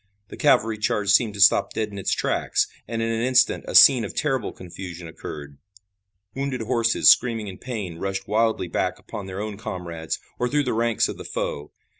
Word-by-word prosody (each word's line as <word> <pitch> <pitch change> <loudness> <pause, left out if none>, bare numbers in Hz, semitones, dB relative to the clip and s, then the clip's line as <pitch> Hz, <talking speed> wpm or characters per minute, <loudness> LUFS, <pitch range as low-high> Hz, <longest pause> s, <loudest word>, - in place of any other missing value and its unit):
The - - -9
cavalry 110 -1 +2
charge 105 -3 0
seemed 105 0 +3
to - - -8
stop 100 +1 +5
dead 110 -1 -1
in 100 -1 -8
its 95 - -2
tracks, - - 0 0.2
and 115 0 -3
in 115 - -1
an 115 0 -1
instant 125 0 +2
a - - -5
scene 130 -4 +8
of 105 - -6
terrible 135 -4 -1
confusion 90 -1 -9
occurred. 75 -3 -9 0.7
Wounded 135 -2 -3
horses 115 0 +4
screaming 115 -4 +1
in 95 -1 -9
pain 105 -10 -6
rushed 95 +1 -4
wildly 110 -2 +1
back 85 - -2
upon 100 -2 -8
their 95 +1 -6
own 105 -1 -5
comrades 85 -6 -5 0.2
or 125 - 0
through 145 +2 +1
the 125 - -1
ranks 115 0 +1
of - - -6
the - - -7
foe. 75 +1 -4
105 Hz, 195 wpm, -23 LUFS, 95-120 Hz, 0.7 s, scene